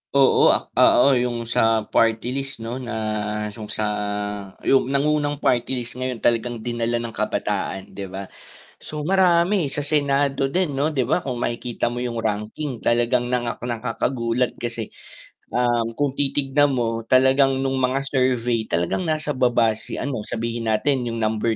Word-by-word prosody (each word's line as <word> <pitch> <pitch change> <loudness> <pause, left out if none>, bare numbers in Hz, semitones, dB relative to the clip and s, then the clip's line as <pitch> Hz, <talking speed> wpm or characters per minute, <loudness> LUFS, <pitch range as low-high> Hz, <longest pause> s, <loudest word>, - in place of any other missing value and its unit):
Oo, 135 -1 +5
ah, - - +2 0.4
oo, 140 - +5
'yung 120 -2 0
sa 115 -1 +2
party-list, 125 +6 0
'no? 120 +3 -4
Na 120 -1 -5 0.6
'yung 105 -1 -9
sa 110 - -2 0.8
'yung 135 -1 +3
nangunang 145 +1 +1
party-list 125 -2 0
ngayon, 130 -1 -2
talagang 120 0 0
dinala 120 0 -1
ng 115 -1 -5
kabataan, 100 -3 -2
'di 100 -1 -6
ba? 95 +1 -6 0.5
So 150 - -7
marami 175 -1 +3
sa - - -1
Senado 140 -2 +1
din, 175 -6 0
'no? 145 +3 +1
'Di 130 -5 0
ba 180 - +1
kung 125 -3 -3
makikita 120 0 -2
mo 120 +1 -4
'yung 115 -2 -2
ranking, 110 +5 -3
talagang 120 +1 +1
nakakagulat. 120 0 -1
Kasi, 120 -2 -4 0.6
um, 120 -2 0
kung 145 +1 0
titignan 140 0 +1
mo, 115 -2 -2
talagang 135 +1 +4
nung 135 0 0
mga 130 +1 +1
survey, 125 -4 0
talagang 85 - -1
nasa 155 -1 -1
baba 120 -4 +3
si - - -7
ano 125 -6 -4
sabihin 115 0 -3
natin 125 +4 +1
'yung 115 -1 -3
number 110 +1 0
125 Hz, 150 wpm, -22 LUFS, 115-140 Hz, 0.8 s, Oo